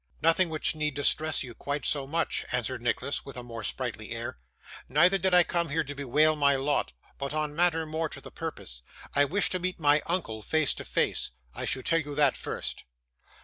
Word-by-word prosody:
'Nothing 165 +2 +4
which 155 -1 0
need 150 -2 -1
distress 155 +2 +3
you 125 -2 -8
quite 145 0 -3
so 140 -2 +1
much,' 165 +3 0
answered 125 0 -1
Nicholas, 125 +3 -1
with 135 -3 -9
a 125 - -5
more 115 -2 -7
sprightly - - -3
air; - - -5 0.5
'neither 175 +8 +5
did 190 +1 +2
I 180 -1 +7
come 170 -2 -1
here 160 +3 +1
to 145 -1 -6
bewail 145 +3 +3
my 140 -2 +4
lot, 135 - 0 0.3
but 140 +2 -3
on 150 -1 -1
matter 165 -1 +2
more 160 +1 -2
to - - -6
the - - -11
purpose. - - -5 0.3
I 145 - +5
wish 195 +8 +1
to 185 - 0
meet 185 0 -2
my 145 -1 +4
uncle 155 -12 -2
face 155 +5 +2
to - - -7
face. - - +1 0.2
I - - -4
should 130 - -2
tell 165 - +3
you 145 -2 -5
that 145 -3 +4
first. - - -5
150 Hz, 205 wpm, -28 LUFS, 140-165 Hz, 0.5 s, I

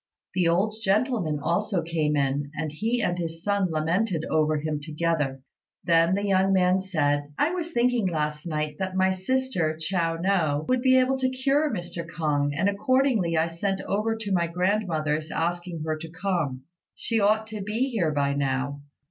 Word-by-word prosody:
The 180 -2 +2
old 200 +6 +1
gentleman 200 - +1
also 175 +3 0
came 155 -3 0
in, 140 +1 0
and 155 -1 -3
he 225 +9 -1
and 175 -2 0
his 165 0 -5
son 200 -2 +1
lamented 165 +3 0
over 155 0 +2
him 150 0 -2
together. 150 -3 -1 0.4
Then 165 +2 +4
the 200 +1 -1
young 195 -1 +3
man 185 0 +3
said, 145 -6 0
"I 310 - +2
was 345 -2 -3
thinking 240 -5 +2
last 150 -1 -2
night 150 -2 -2
that 190 -1 -3
my 190 0 +3
sister, 185 -5 -1
Chiao 165 -1 0
no, 165 -5 +1
would 255 -1 +2
be 260 0 +5
able 260 +1 +2
to 260 0 +2
cure 275 +4 +1
Mr. 175 -4 -4
K'ung, 150 -4 -1
and 195 - +2
accordingly 210 -4 +2
I 160 +1 +3
sent 195 +4 -2
over 215 +3 -1
to 220 -2 -5
my 170 -2 +2
grandmother's 165 -4 0
asking 170 0 -2
her 155 -1 0
to 165 +1 -8
come. 165 -7 -2 0.3
She 230 -1 -1
ought 215 +2 +3
to 215 -1 -5
be 225 +7 -1
here 180 -9 +1
by 140 -1 +1
now." 140 0 -1
175 Hz, 175 wpm, -26 LUFS, 155-210 Hz, 0.4 s, be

